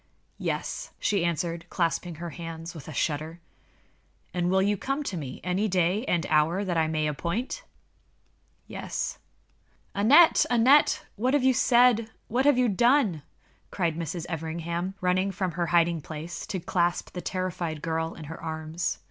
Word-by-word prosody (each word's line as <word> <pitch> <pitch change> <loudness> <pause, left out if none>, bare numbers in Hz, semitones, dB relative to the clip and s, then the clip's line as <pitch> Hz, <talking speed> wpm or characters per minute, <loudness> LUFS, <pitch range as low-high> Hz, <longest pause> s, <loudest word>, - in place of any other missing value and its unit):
"Yes," - - -3
she 200 -4 +1
answered, 170 0 -2
clasping 170 0 -1
her 170 +1 -6
hands 165 +1 -7
with 160 -5 -10
a - - -6
shudder. 155 +3 -2 0.9
"And 175 -1 0
you - - +1
will 195 +2 +2
come 275 +8 -2
to 200 - -4
me 140 -6 -6
any 185 +4 0
day 185 +4 +1
and 170 -7 0
hour 160 +6 +2
that 180 -2 -1
I 160 -1 +2
may 155 -1 0
appoint?" 175 - -3 1.0
"Yes." - - -4 0.7
"Aneth! 275 +12 +6
Aneth! 250 +5 +5
what 255 +6 +2
have 285 - +2
you 260 0 +5
said? 240 -3 +4 0.2
What 255 +4 +1
have 290 -3 +5
you 250 -1 +4
done?" 230 - +3 0.5
cried 170 -4 -1
Mrs. 165 +1 -4
Everingham, 170 +3 -3
running 185 +2 +2
from 185 -1 -2
her 170 +1 -2
hiding 170 -1 +3
place 155 +3 -7
to 190 - -3
clasp 175 0 0
the 180 - -5
terrified 175 -5 -3
girl 160 0 -2
in 160 - -9
her 160 +2 -8
arms. 160 +1 -3
175 Hz, 155 wpm, -27 LUFS, 165-205 Hz, 1.0 s, Aneth